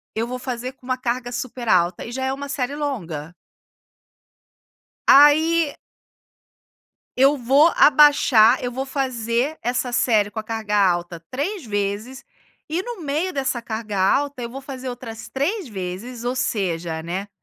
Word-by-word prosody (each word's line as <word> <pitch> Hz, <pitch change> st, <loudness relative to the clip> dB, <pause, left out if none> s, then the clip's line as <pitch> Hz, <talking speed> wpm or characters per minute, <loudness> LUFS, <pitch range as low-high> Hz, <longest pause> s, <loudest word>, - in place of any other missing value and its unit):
eu 225 Hz, +1 st, -1 dB
vou 250 Hz, +1 st, -4 dB
fazer 250 Hz, 0 st, -5 dB
com 260 Hz, -, -22 dB
uma 255 Hz, 0 st, -1 dB
carga 245 Hz, 0 st, -3 dB
super 245 Hz, -1 st, -5 dB
alta, 175 Hz, -1 st, +2 dB
e 230 Hz, -, -7 dB
já 260 Hz, +2 st, -3 dB
é 265 Hz, -, 0 dB
uma 280 Hz, +1 st, -6 dB
série 275 Hz, 0 st, -2 dB
longa 175 Hz, -, -4 dB, 1.7 s
aí 305 Hz, +2 st, +6 dB, 1.4 s
eu 275 Hz, +3 st, +5 dB
vou 275 Hz, +6 st, +4 dB
abaixar 270 Hz, -5 st, +6 dB
eu 245 Hz, -, -2 dB
vou 265 Hz, +2 st, -4 dB
fazer 260 Hz, +1 st, -1 dB
essa 245 Hz, +1 st, -1 dB
série 215 Hz, -4 st, +2 dB
com 215 Hz, -, -7 dB
a -, -, -2 dB
carga 220 Hz, -2 st, -3 dB
alta 175 Hz, -3 st, +1 dB
3 320 Hz, +7 st, -3 dB
vezes, 210 Hz, +6 st, -3 dB, 0.4 s
e 330 Hz, +4 st, -1 dB
no 470 Hz, -4 st, -7 dB
meio 310 Hz, +6 st, -2 dB
dessa 265 Hz, -3 st, -1 dB
carga 220 Hz, -3 st, -5 dB
alta, 270 Hz, +7 st, +1 dB
eu 235 Hz, -, -4 dB
vou 270 Hz, +3 st, -8 dB
fazer 265 Hz, -1 st, -7 dB
outras 240 Hz, -2 st, -8 dB
3 325 Hz, -, -2 dB
vezes, 205 Hz, +5 st, -6 dB
ou 245 Hz, +1 st, -1 dB
seja, 170 Hz, -9 st, -2 dB
né, 185 Hz, +5 st, -4 dB
250 Hz, 150 wpm, -22 LUFS, 215-275 Hz, 1.7 s, aí